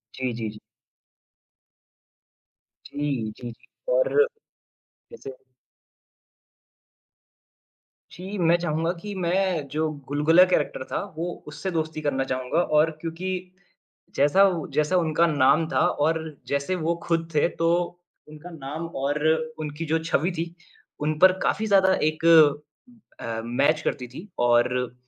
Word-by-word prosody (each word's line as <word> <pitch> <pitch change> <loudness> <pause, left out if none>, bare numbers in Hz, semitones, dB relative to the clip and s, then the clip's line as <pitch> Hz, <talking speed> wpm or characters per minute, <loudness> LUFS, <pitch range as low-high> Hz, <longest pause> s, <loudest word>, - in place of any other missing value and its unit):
जी, 130 -1 -2
जी, 115 -1 -4
जी। 105 0 -11 2.3
जी, 140 -7 -3
जी, 120 -1 -7
जी। - - -10
और - - +3 0.9
जैसे 440 -3 -9 2.8
जी, 190 +3 -7
मैं 170 -2 +4
चाहूँगा 165 0 -1
कि 205 +4 -8
मैं 180 -3 0
जो 155 +1 0 0.2
गुलगुला 150 +5 +5
कैरेक्टर 150 -7 -1
था, - - -4 0.2
वो 175 +2 -5
उससे 185 +5 -5
दोस्ती 160 -2 -3
करना 140 -3 0
चाहूँगा 130 +6 0 0.2
और 155 +2 +4
क्योंकि 165 +2 -5 0.9
जैसा 145 +8 +4 0.3
जैसा 155 +4 +2
उनका 165 -1 +2
नाम 145 +1 +3
था - - 0 0.3
और 165 +1 +1 0.3
जैसे 140 +6 -1
वो 170 -1 -1
खुद 165 -1 0
थे 150 - +3
तो 165 - +3 0.6
उनका 155 +3 -11
नाम 150 +2 -6 0.2
और 145 +2 -1 0.4
उनकी 155 +1 -5
जो 160 +1 +1
छवि 165 +2 0
थी, 170 +1 -3 0.5
उन 150 +1 -1
पर 185 +2 +8
काफ़ी 220 - 0
ज़्यादा 190 -2 +4
एक 155 +1 -1 0.9
अ, 115 -1 -4
मैच 145 +6 +1
करती 125 -5 -3
थी 140 - -11 0.2
और 120 +1 +2
155 Hz, 125 wpm, -25 LUFS, 140-175 Hz, 2.8 s, पर